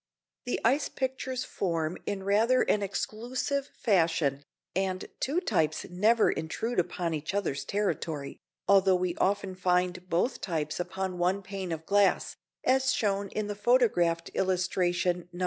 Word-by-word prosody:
The 245 - -1
ice 270 +6 +3
pictures 260 -1 -3
form 165 -6 -2
in 200 -2 -2
rather 220 +6 +3
an 210 - +1
exclusive 245 +8 -2
fashion, 165 - +1 0.3
and 190 0 -1
two 295 +6 +1
types 160 - 0
never 215 +5 +4
intrude 185 +8 -2
upon 170 -1 -1
each 155 +5 -3
other's 175 -9 -1
territory, 165 -8 -2 0.3
although 195 -1 +5
we 180 -1 0
often 195 0 0
find 180 0 0
both 185 +10 0
types 155 -4 -2
upon 185 0 -3
one 185 +3 +1
pane 190 -2 -5
of 160 0 -4
glass, 200 +1 +2 0.3
as 265 +1 +3
shown 200 -2 0
in 215 +2 -2
the 205 - -3
photographed 205 -7 +2
illustration 180 -1 0
Nos. 175 - -10
190 Hz, 140 wpm, -29 LUFS, 175-215 Hz, 0.3 s, although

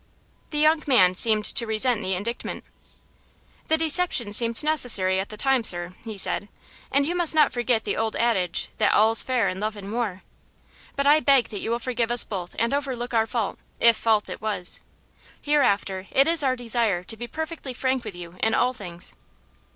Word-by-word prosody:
The 300 - -5
young 310 +1 +3
man 185 -10 +5
seemed 215 +2 +2
to 235 - +2
resent 220 +1 +1
the 190 -1 -2
indictment. 220 +6 -5 1.0
"The 320 - +2
deception 320 - +2
seemed 230 +4 +2
necessary 230 -12 +3
at 190 - -4
the 215 - -10
time, 265 0 +1
sir," 175 -2 0
he 220 -3 -8
said, 205 +1 -1 0.4
"and 280 +1 +2
you 335 - -1
must 345 -3 +2
not 305 -2 +4
forget 240 -2 0
the - - -2
old 225 -1 -2
adage 200 -7 0
that - - +3
'all's 220 +1 +5
fair 250 -5 0
in 185 - -4
love 215 +1 -3
and 205 0 -8
war.' 215 -6 -3 0.7
But 280 - -1
I 295 +2 +5
beg 275 -5 +3
that 205 - -6
you - - -4
will 235 - 0
forgive 240 -1 -2
us 240 0 +4
both 180 -4 -7
and 230 +3 0
overlook 260 -4 -3
our 225 -1 +2
fault, 225 -2 -3 0.2
if 235 0 +5
fault 220 -2 +1
it - - -8
was. 205 -5 -2 0.6
Hereafter 200 -10 0
it 275 +2 +3
is 330 -1 +2
our 260 -2 +1
desire 230 -6 0
to 225 - -5
be 240 +2 -7
perfectly 315 -3 -6
frank 260 0 -1
with 215 -5 -8
you 175 0 -10
in 220 - +2
all 250 +1 +1
things." 180 -6 -7
230 Hz, 195 wpm, -24 LUFS, 205-265 Hz, 1.0 s, man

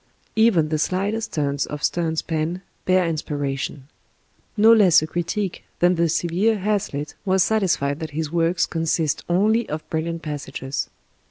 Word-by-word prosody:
Even 210 -9 +4
the 155 -1 0
slightest 200 +7 -1
turns 145 -2 -1
of 150 0 -6
Sterne's 165 -2 0
pen 165 +3 -2 0.2
bear 185 -1 +3
inspiration. 145 -3 -3 0.7
No 220 +2 +7
less 190 -8 +6
a - - 0
critic 175 +4 -3
than 175 +1 +4
the 170 -1 +1
severe 175 +7 +1
Hazlitt 190 -8 -2
was 190 -2 +3
satisfied 175 -10 +1
that 160 -2 -4
"his 155 +1 -3
works 170 +1 +2
consist 165 -1 -1
only 215 +6 +2
of 155 +1 -5
brilliant 165 +1 -2
passages." 140 -2 -4
165 Hz, 145 wpm, -22 LUFS, 155-190 Hz, 0.7 s, No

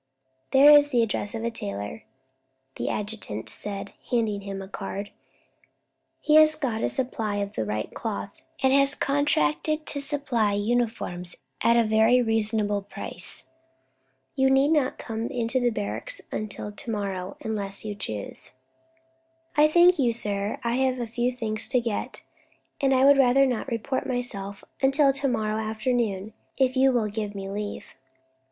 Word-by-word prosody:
"There 280 +2 +8
is 290 0 +6
the 245 -4 +3
address 210 -1 -2
of 225 - -4
a 235 - -1
tailor," 100 - -6 0.7
the 120 - -2
adjutant 200 - -4
said, 200 - -6 0.2
handing 220 -4 0
him 195 -1 -6
a 195 - -7
card; 200 0 -6 1.1
"he 305 0 +4
has 310 0 +7
got 245 -7 -2
a - - +2
supply 225 -5 -2
of 200 0 -3
the 110 - -2
right 105 +1 -3
cloth, 100 0 -4 0.3
and 265 0 +4
has 275 +1 +4
contracted 285 - +1
to 285 - -4
supply 275 -7 0
uniforms 205 - -2 0.2
at 235 0 +4
a 235 - +5
very 220 +3 +4
reasonable 215 -3 0
price. 200 - -9 0.9
You 265 -1 +3
need 270 +2 +4
not 295 -5 +2
come 225 0 -4
into 245 0 +1
barracks 230 - -4
until 210 -1 -4
to 205 +3 -7
morrow, 195 -3 -3
unless 200 -2 -4
you 210 - -3
choose." 110 - -7 1.0
"I 300 +1 +6
thank 345 +2 +5
you, 240 -4 +3
sir. 205 -2 -3
I 235 +1 0
have 260 -1 +1
a 240 - -1
few 240 +2 -1
things 220 -3 -4
to 250 +2 +2
get, 230 -3 -4 0.6
and 270 -1 +3
I 265 0 +4
would 280 0 +7
rather 270 +1 +5
not 250 -2 -1
report 260 +2 -2
myself 205 -6 -4 0.2
until 275 +1 +4
to 275 +1 -1
morrow 220 -3 0
afternoon, 220 -2 -1 0.2
if 260 -1 +2
you 265 +1 +5
will 235 -4 +1
give 210 -1 -4
me 195 0 -5
leave." 205 0 -4
225 Hz, 155 wpm, -26 LUFS, 205-265 Hz, 1.1 s, There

